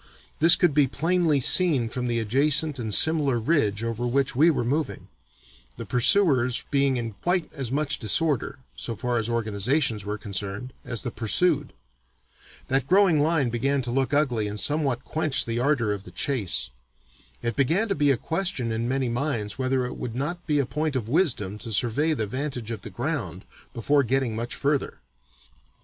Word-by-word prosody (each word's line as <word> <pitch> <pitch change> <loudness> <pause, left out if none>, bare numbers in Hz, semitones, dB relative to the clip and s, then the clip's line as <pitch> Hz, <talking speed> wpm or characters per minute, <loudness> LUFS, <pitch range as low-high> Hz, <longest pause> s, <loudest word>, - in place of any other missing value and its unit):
This 165 +2 +8
could 175 -5 +2
be 145 -1 +3
plainly 165 +1 +1
seen 140 -3 +5
from 125 +2 -4
the 120 -1 -1
adjacent 140 +6 +2
and 110 -2 -4
similar 145 -1 +3
ridge 110 -6 0
over 115 +1 -3
which 135 +1 0
we 155 +6 +5
were 145 -7 0
moving, 145 +5 -3 0.7
the - - -7
pursuers 125 -2 +3
being 140 -2 +2
in 115 -1 -4
quite 180 -1 -1
as 135 -5 -5
much 150 +2 0
disorder 140 +5 0 0.2
(so 115 - -5
far 120 +2 -1
as 115 +1 -3
organizations 115 +1 0
were 105 +1 -4
concerned) 100 +4 -4
as 120 -3 -4
the 120 - -4
pursued. 145 +7 +1 1.0
That 135 0 0
growing 185 -3 +4
line 150 -5 +1
began 135 +3 0
to 120 - -4
look 135 +1 0
ugly 130 -8 +1
and 105 +1 -5
somewhat 140 +1 -1
quenched 155 -3 0
the 115 0 -2
ardor 125 -5 +1
of 100 -2 -7
the - - -11
chase. 95 - -1 0.7
It 115 -2 -2
began 165 - +1
to 200 - 0
be 145 -3 +1
a 135 - +3
question 160 - -3
in 115 +2 -2
many 135 -1 -1
minds 120 -5 -3
whether 130 -1 0
it 125 - -6
would 115 -2 -6
not 170 +7 -4
be 150 -2 +1
a 140 - +1
point 150 +2 -3
of 115 -4 -3
wisdom 120 - 0
'to 115 - -8
survey 130 +8 +1
the 110 -7 -2
vantage 130 -1 -4
of 110 -3 -5
the 110 - -8
ground' 100 - -4 0.3
before 140 +3 +1
getting 130 -3 -1
much 115 +2 -4
further. 140 0 -1
130 Hz, 180 wpm, -25 LUFS, 115-150 Hz, 1.0 s, This